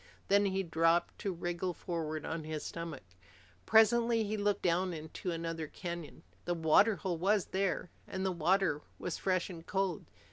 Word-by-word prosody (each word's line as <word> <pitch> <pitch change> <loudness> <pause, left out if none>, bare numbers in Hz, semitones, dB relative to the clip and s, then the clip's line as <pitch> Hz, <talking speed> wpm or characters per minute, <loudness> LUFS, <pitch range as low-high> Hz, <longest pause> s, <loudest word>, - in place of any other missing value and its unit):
Then 200 +1 +5
he 195 0 0
dropped 165 0 +2
to 200 - -1
wriggle 175 0 -3
forward 160 -3 -3
on 160 0 -3
his 155 -1 -4
stomach. 165 - -6 0.6
Presently 230 +1 +5
he 215 +1 -2
looked 205 -1 0
down 180 +1 +2
into 160 +3 -6
another 165 -1 -3
canyon. 170 -1 -7 0.2
The 175 - 0
water 170 +7 +5
hole 175 -1 -3
was 195 +1 +2
there, 190 -2 0 0.2
and 190 0 -3
the 190 - +1
water 175 -2 +2 0.2
was 180 - -4
fresh 185 -2 +1
and 165 -2 -9
cold. 190 -3 -1
175 Hz, 165 wpm, -33 LUFS, 165-195 Hz, 0.6 s, Then